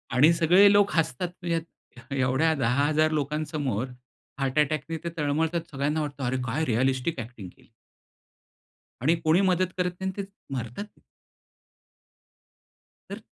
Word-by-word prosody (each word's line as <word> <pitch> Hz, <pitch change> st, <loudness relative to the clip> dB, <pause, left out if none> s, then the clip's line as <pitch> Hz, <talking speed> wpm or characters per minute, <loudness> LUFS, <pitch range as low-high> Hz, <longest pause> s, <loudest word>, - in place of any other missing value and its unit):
आणि 150 Hz, +6 st, +6 dB
सगळे 180 Hz, +5 st, +6 dB
लोक 205 Hz, 0 st, +4 dB
हसतात 165 Hz, +1 st, 0 dB
ह्यात 165 Hz, -6 st, -6 dB
एवढ्या 135 Hz, +5 st, +2 dB
10,000 145 Hz, +5 st, +2 dB
लोकांसमोर 145 Hz, -5 st, -2 dB, 0.5 s
हार्ट 135 Hz, +1 st, 0 dB
अटॅकनी 155 Hz, +2 st, 0 dB
ते 170 Hz, -, -2 dB
तळमळतात 160 Hz, +3 st, 0 dB
सगळ्यांना 145 Hz, +3 st, -1 dB
वाटतं 145 Hz, -2 st, -5 dB
अरे 125 Hz, +1 st, 0 dB
काय 140 Hz, +7 st, -1 dB
रिअलिस्टिक 130 Hz, +4 st, 0 dB
ॲक्टिंग 110 Hz, -5 st, -8 dB
केली. -, -, -23 dB, 1.3 s
आणि 155 Hz, +7 st, +3 dB
कोणी 160 Hz, +4 st, +4 dB
मदत 185 Hz, 0 st, +1 dB
करत 180 Hz, -1 st, 0 dB
नाही 190 Hz, -, -2 dB
अन् 190 Hz, -, -7 dB
ते -, -, -6 dB, 0.3 s
मरतात. 125 Hz, -, -5 dB, 2.2 s
तर -, -, -6 dB
150 Hz, 125 wpm, -26 LUFS, 130-165 Hz, 2.2 s, आणि